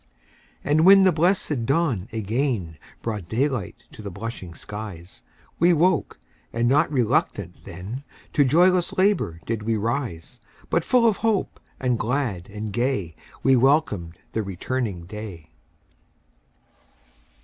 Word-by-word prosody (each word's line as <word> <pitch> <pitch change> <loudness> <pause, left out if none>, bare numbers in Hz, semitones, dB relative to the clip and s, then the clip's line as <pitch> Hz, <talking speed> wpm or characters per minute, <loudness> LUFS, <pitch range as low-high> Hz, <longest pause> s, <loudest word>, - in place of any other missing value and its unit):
And 150 +2 +3
when 195 +2 +8
the 185 - +6
blessed 155 - +1
dawn 135 - +1
again 110 - -2 0.2
Brought 105 -6 -4
daylight 125 -4 -1
to - - -11
the 100 - -5
blushing 95 -3 -7
skies, 100 -5 -8 0.4
We 175 +2 +5
woke, 170 0 +2 0.3
and 115 +1 +1
not 150 +6 +3
RELUCTANT 125 -6 0
then, 100 +10 -7 0.3
To 145 - +5
joyless 175 +6 +4
LABOUR 185 - +2
did 115 -1 -2
we 110 +1 0
rise; 115 -6 -3 0.3
But 170 - +2
full 245 +3 +3
of 215 -3 +2
hope, 220 -3 0 0.2
and 125 -3 0
glad 115 -7 -1
and 105 0 -6
gay, 110 - -1 0.3
We 135 0 +5
welcomed 125 - +2 0.2
the 110 - 0
returning 100 0 -3
day. 95 -5 -8
120 Hz, 125 wpm, -24 LUFS, 100-150 Hz, 0.4 s, when